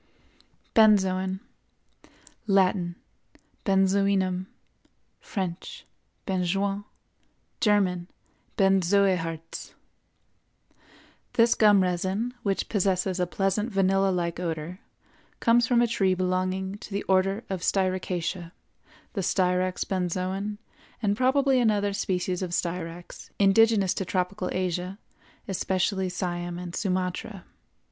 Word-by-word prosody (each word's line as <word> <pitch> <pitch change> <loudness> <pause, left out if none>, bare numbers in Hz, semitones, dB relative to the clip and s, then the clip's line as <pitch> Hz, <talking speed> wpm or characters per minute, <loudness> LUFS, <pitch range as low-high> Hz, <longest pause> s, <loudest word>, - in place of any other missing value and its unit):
BENZOIN. 190 -3 +3 1.1
Latin—Benzoinum; 190 0 0 0.7
French—Benjoin; 190 +1 -4 0.7
German—Benzoëharz. 185 -3 0 1.6
This 230 0 +5
gum 205 -3 +5
resin, 190 +6 -1
which 200 -3 -1
possesses 190 -2 0
a 180 - +1
pleasant 195 +5 -1
vanilla 195 0 +2
like 175 -2 -1
odor, 165 +1 -4 0.6
comes 235 +1 +4
from 240 -1 +4
a - - +3
tree 195 -5 +1
belonging 185 +2 -1
to - - -10
the 200 +1 -2
Order 195 +3 +1
of 190 -3 -4
Styracaceæ, 185 -2 -1 0.6
the 200 - -2
Styrax 180 0 +1
Benzoin, 190 +2 -2 0.5
and 205 -1 +2
probably 265 +2 +3
another 205 -4 +2
species 185 -2 -1
of 180 -2 -3
Styrax, 175 0 -5
indigenous 200 -1 +4
to - - -2
tropical 185 +1 -2
Asia, 185 +1 -2 0.5
especially 190 0 0
Siam 175 -1 -3
and 175 -1 -6
Sumatra. 185 0 -2
190 Hz, 90 wpm, -26 LUFS, 180-200 Hz, 1.6 s, This